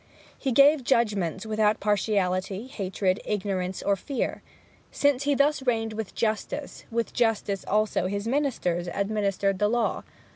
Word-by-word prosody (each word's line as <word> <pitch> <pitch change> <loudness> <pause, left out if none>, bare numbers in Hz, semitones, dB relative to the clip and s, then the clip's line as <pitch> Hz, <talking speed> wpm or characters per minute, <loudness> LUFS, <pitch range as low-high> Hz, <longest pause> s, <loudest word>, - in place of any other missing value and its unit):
He 270 - -2
gave 280 +3 +6
judgments 210 -7 +1
without 215 -1 +1
partiality, 200 -1 0
hatred, 195 -5 -1
ignorance, 190 -3 -2
or 200 - +2
fear. 265 +7 -3 0.5
Since 285 -1 +1
he 285 -1 +2
thus 285 +1 +2
reigned 225 -4 0
with 215 -2 -5
justice, 225 +6 -3
with 230 0 -2
justice 220 -4 0
also 210 -3 +1
his 200 +3 -3
ministers 230 - 0
administered 200 -1 0
the 210 - +3
law. 235 0 0
215 Hz, 135 wpm, -26 LUFS, 195-240 Hz, 0.5 s, gave